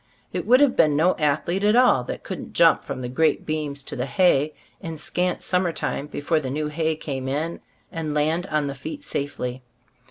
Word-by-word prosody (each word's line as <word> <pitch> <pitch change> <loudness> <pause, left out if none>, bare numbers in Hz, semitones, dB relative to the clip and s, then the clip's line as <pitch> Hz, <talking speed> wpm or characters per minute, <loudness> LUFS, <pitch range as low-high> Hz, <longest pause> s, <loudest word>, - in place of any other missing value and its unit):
It - - -3
would 255 +4 +6
have 285 -3 +4
been 150 -2 +4
no 170 +5 +3
athlete 155 +6 0
at 210 +2 +4
all 245 - +5
that - - -6
couldn't - - -7
jump - - +5
from - - -5
the 125 - -3
great 155 +6 +1
beams 150 -3 -3
to - - -7
the 125 +2 -2
hay, 155 -4 +3 0.3
in 165 -1 -6
scant 180 +4 -1
summer 180 -1 +1
time 150 -2 -3
be - - -6
fore 160 +2 +2
the 135 -4 -4
new 150 +3 -2
hay 160 +1 0
came 135 -4 -5
in, 155 +5 -2 0.3
and 155 -2 -3
land 160 +5 +1
on 150 -3 0
the 140 - -3
feet 290 - -7
safely. 130 - -4
155 Hz, 210 wpm, -24 LUFS, 140-175 Hz, 0.3 s, would